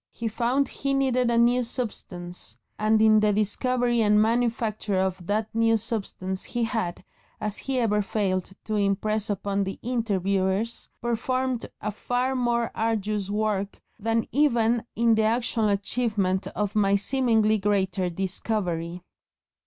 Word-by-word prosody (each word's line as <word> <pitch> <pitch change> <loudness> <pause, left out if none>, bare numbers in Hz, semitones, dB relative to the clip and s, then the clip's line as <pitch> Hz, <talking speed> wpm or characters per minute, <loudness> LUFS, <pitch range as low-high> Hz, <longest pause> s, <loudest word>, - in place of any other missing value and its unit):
He 235 - -5
found 245 +5 +1
he 275 0 -2
needed 255 -3 +2
a 235 - +2
new 240 +2 +4
substance, 180 - -6 0.2
and 215 +1 +3
in 215 -1 +6
the 210 0 +3
discovery 240 +3 +1
and 210 -1 +4
manufacture 225 -2 +1
of 185 -2 -1
that 210 +1 -1
new 225 0 +3
substance 195 -4 -4
he 240 -1 -2
had, 220 -7 -2 0.4
as 210 -1 -3
he 270 -1 -2
never 210 -4 +2
failed 195 -3 -1
to 215 - -4
impress 210 +1 0
upon 200 0 -1
the 195 0 -4
interviewers, 200 -2 -1
"performed 250 +1 -1
a 210 - -2
far 245 +5 -1
more 240 -2 0
arduous 215 -3 -1
work 205 -1 -1 0.2
than 225 +1 0
even 240 -5 +2
in 230 0 +4
the 220 - +3
actual 225 0 +1
achievement 200 -2 0
of 205 -1 -2
my 200 -2 +3
seemingly 220 -1 +2
greater 195 -2 0
discovery." 180 -2 -3
215 Hz, 135 wpm, -26 LUFS, 200-235 Hz, 0.4 s, in